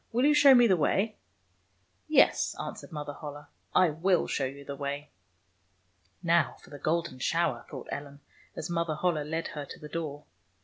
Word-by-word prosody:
Will 245 +3 +2
you 300 - +6
show 290 -2 +8
me 245 -1 +7
the 195 -5 +5
way? 195 +7 +1 0.3
" 90 +1 -42
" - - -41 0.2
Yes," - - +4
answered - - -6
Mother 150 -2 -5
Holle, 145 0 -8 0.2
" - - -33
I 165 - +1
will 175 +4 +2
show 135 - -1
you 140 +2 -7
the 140 - -5
way." 140 +1 -4 1.1
"Now 170 -5 +3
for - - -16
the 145 - -9
golden 160 -3 -1
shower," 160 -4 0
thought - - -8
Ellen, 145 0 -6 0.3
as 160 - -4
Mother 170 -2 -1
Holle 155 -1 0
led 160 +2 -3
her 150 - -5
to - - -10
the 150 - -9
door. 150 -3 -4
150 Hz, 190 wpm, -29 LUFS, 145-170 Hz, 1.1 s, show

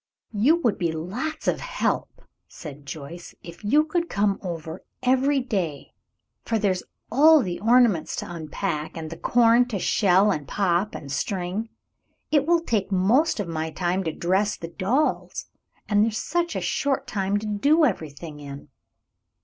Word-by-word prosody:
"You 235 +10 +4
would 225 -4 +1
be 170 -3 0
lots 205 - -4
of - - +1
help," - - -2 0.2
said 145 -3 -10
Joyce, 155 +4 -8
"if 170 +2 -11
you 290 +9 +4
could 340 +2 -2
come 200 0 +1
over 165 -2 -6 0.2
every 265 +2 +3
day, 185 - -3 0.5
for 225 - 0
there's 195 -4 0 0.3
all 300 +4 +6
the 180 -3 -4
ornaments 230 -6 +3
to - - -4
unpack, 160 -1 -4
and 160 -1 -6
the - - -5
corn 235 +5 +4
to 225 -5 -3
shell, 195 +1 +3
and 150 -6 -3
pop, 195 +1 0
and 140 - -7
string. 185 - -2 0.6
It 295 -1 +3
will 340 0 +4
take 215 - -1
most 225 - +3
of 200 - -2
my 160 -1 -3
time 180 +3 -1
to 160 - 0
dress 190 +6 0
the 165 - -7
dolls, 225 - -1 0.4
and 205 0 +3
there's 220 -1 0
such 345 +5 -1
a - - -1
short 280 -1 -1
time 200 0 -1
to 210 - -5
do 285 +10 +3
everything 155 - -4
in." 140 0 -9
200 Hz, 160 wpm, -24 LUFS, 170-245 Hz, 0.6 s, all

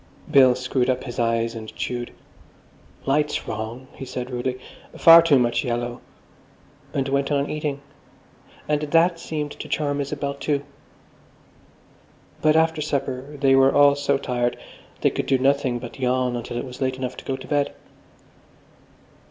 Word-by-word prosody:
Bill 130 -4 +6
screwed 130 0 -1
up 130 0 0
his 120 -3 -6
eyes 115 0 +1
and 110 -1 -8
chewed. 120 -1 -4 0.9
"Light's 150 +2 0
wrong," 110 +4 -5
he - - -9
said 125 0 -5
rudely, 125 +1 -2 0.4
"far 165 0 +9
too 160 -4 +4
much 120 -2 +1
yellow"; 120 -1 -3 0.9
and 135 -1 -1
went 140 +1 0
on 140 0 +1
eating. 150 -2 -3 0.9
And 150 -1 +1
that 165 +3 +2
seemed 150 -3 -4
to - - -8
charm 145 -2 -1
Isabel, 140 0 -3
too. 140 0 -2 1.8
But 155 0 +4
after 160 -1 +2
supper 140 -1 -3
they 135 -1 +4
were 135 0 +5
all 145 0 +7
so 140 -1 +1
tired 120 -2 -1 0.4
they - - +3
could - - -3
do 135 - +3
nothing 135 -1 +1
but 120 +2 -9
yawn 125 -1 0
until 120 0 -5
it 120 - -3
was 125 0 -10
late 130 -1 0
enough 130 -1 -4
to - - -10
go 135 - -2
to - - -10
bed.... 145 -1 0
135 Hz, 155 wpm, -23 LUFS, 125-145 Hz, 1.8 s, far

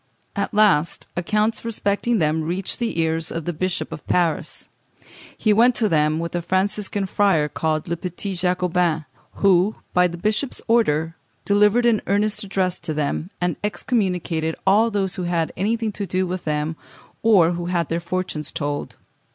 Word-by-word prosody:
At 200 - -1
last 200 -7 +3
accounts 210 +5 0
respecting 230 +1 0
them 160 -2 +1
reached 175 +4 -3
the 230 -8 -2
ears 160 0 0
of 165 -2 -4
the 175 - -2
Bishop 170 -1 -2
of - - -7
Paris. 170 -3 0 0.7
He 215 - +3
went 235 +3 +5
to 220 - +2
them 155 -3 +2
with 170 +1 -4
a 175 - -1
Franciscan 195 +2 0
friar, 190 -6 +2
called 155 +1 -2
Le 170 - -1
Petit 180 +3 -5
Jacobin, 180 -3 0 0.3
who, 195 +1 +3 0.2
by 180 0 +5
the 170 0 -7
bishop's 215 +8 -1
order, 165 -9 +2 0.3
delivered 210 +4 +4
an 230 -3 +3
earnest 210 +2 +1
address 190 -2 -1
to 160 -3 -4
them, 150 +3 -2
and 175 -3 -1
excommunicated 180 -7 -1
all 210 +4 +4
those 195 -3 -1
who 180 - -2
had 170 -2 -1
anything 225 +3 0
to 200 -1 -5
do 185 +2 0
with 180 0 -4
them, 150 +1 -1 0.4
or 195 -7 +5
who 175 0 -3
had 170 -3 0
their 165 - 0
fortunes 170 -4 -3
told. 145 0 -3
180 Hz, 165 wpm, -22 LUFS, 165-205 Hz, 0.7 s, went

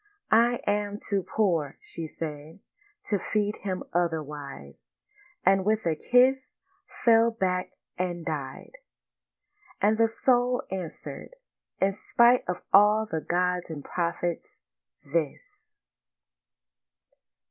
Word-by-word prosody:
'I 235 +2 +4
am 205 0 0
too 200 -2 -2
poor,' 170 -9 0
she 165 -2 -7
said, 155 +1 -7 0.4
'To 205 - -1
feed 210 +1 -1
him 185 -2 -4
otherwise'; 150 -5 -4 0.6
and 195 0 +4
with 215 +1 +1
a 165 -2 +1
kiss 255 +8 +2 0.5
Fell 230 0 +6
back 185 -4 -2 0.3
and 175 -2 -2
died. 135 -4 -5 1.1
And 215 +2 +2
the 225 - +5
soul 245 +2 +1
answeréd, 185 - -6 0.5
'In 195 +1 +2
spite 235 +4 +4
of 180 - -3
all 210 +2 +6
the 160 -7 -3
gods 180 +1 0
and 150 -3 -6
prophets—this! 150 - -5
185 Hz, 105 wpm, -27 LUFS, 160-220 Hz, 1.1 s, Fell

